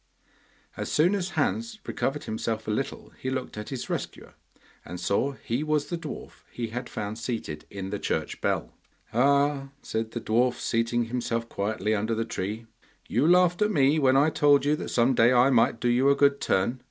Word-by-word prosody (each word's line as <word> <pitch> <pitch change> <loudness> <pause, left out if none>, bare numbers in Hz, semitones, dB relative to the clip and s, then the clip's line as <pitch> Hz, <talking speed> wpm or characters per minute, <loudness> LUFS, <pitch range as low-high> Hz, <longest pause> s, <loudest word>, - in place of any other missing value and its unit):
As - - -4
soon 170 +6 +3
as 190 -3 -1
Hans 230 -1 0
recovered 145 +2 -2
himself 110 0 -3
a - - 0
little 135 +6 -3
he 130 - -3
looked 130 -1 -4
at 105 0 -6
his 130 -3 -5
rescuer, - - -5 0.5
and 90 - -7
saw 100 +10 0
he 130 +1 -3
was 155 -1 +1
the 175 - -1
dwarf 155 -3 -8
he 115 -2 -4
had 120 +3 -5
found 105 +2 -5
seated 110 -10 -4
in 95 -1 -6
the 105 - -3
church - - -2
bell. - - -1 0.4
'Ah!' 140 +3 +3 0.2
said 110 0 -2
the 120 - -5
dwarf, 120 +3 +2
seating 115 +1 0
himself 115 -1 -2
quietly 105 0 -1
under 110 +2 0
the 115 +1 -1
tree. 110 +1 -4 0.4
'You 130 +7 +2
laughed 180 0 +4
at 210 - +4
me 150 -4 +3
when 135 -2 +4
I 150 +3 +4
told 145 -2 +4
you 150 +1 +3
that - - -5
some 120 +2 +3
day 120 0 +5
I 125 +2 +5
might 115 -2 +3
do 120 - 0
you 125 +3 +4
a 140 - +5
good 140 0 +3
turn. 115 +7 +1
125 Hz, 195 wpm, -27 LUFS, 110-140 Hz, 0.5 s, day